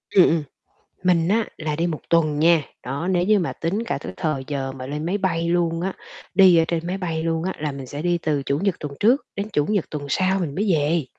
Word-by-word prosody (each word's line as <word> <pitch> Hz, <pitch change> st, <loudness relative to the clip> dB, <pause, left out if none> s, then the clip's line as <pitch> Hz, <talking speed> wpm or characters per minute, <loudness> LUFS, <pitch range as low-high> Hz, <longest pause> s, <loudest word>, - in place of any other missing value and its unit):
Ừm, 185 Hz, -, +8 dB
ừm. 160 Hz, -1 st, +1 dB, 0.6 s
Mình 175 Hz, -2 st, +3 dB
á 220 Hz, +2 st, +2 dB
là 155 Hz, -2 st, -2 dB
đi 170 Hz, -, 0 dB
1 160 Hz, -3 st, -3 dB
tuần 155 Hz, -3 st, +3 dB
nha. 165 Hz, 0 st, +5 dB, 0.2 s
Đó, 140 Hz, +7 st, -3 dB
nếu 175 Hz, -2 st, +2 dB
như 210 Hz, +2 st, +4 dB
mà 175 Hz, -, -1 dB
tính 195 Hz, +8 st, -2 dB
cả -, -, -2 dB
cái -, -, -6 dB
thời 155 Hz, -6 st, -2 dB
giờ 135 Hz, -2 st, -3 dB
mà 130 Hz, -1 st, -7 dB
lên 150 Hz, +3 st, -4 dB
máy 195 Hz, +4 st, 0 dB
bay 170 Hz, -4 st, 0 dB
luôn 170 Hz, -1 st, +1 dB
á, 190 Hz, +2 st, -1 dB, 0.4 s
đi 185 Hz, -2 st, +7 dB
ở 165 Hz, -, +4 dB
trên 170 Hz, 0 st, -1 dB
máy 185 Hz, +2 st, -2 dB
bay 165 Hz, -3 st, -2 dB
luôn 165 Hz, 0 st, -1 dB
á, 190 Hz, -, -1 dB
là 150 Hz, -1 st, -2 dB
mình 135 Hz, -1 st, -7 dB
sẽ 145 Hz, +4 st, -6 dB
đi 175 Hz, 0 st, +1 dB
từ 150 Hz, -4 st, -1 dB
Chủ 140 Hz, +1 st, -1 dB
nhật 195 Hz, 0 st, +1 dB
tuần 145 Hz, -2 st, -5 dB
trước 245 Hz, +7 st, +3 dB
đến 200 Hz, +2 st, -3 dB
Chủ 150 Hz, -4 st, +1 dB
nhật 205 Hz, -5 st, +1 dB
tuần 145 Hz, -2 st, -5 dB
sau 185 Hz, +6 st, +1 dB
mình 150 Hz, -5 st, -3 dB
mới 200 Hz, 0 st, +1 dB
về. 155 Hz, 0 st, +1 dB
165 Hz, 260 wpm, -23 LUFS, 150-185 Hz, 0.6 s, Ừm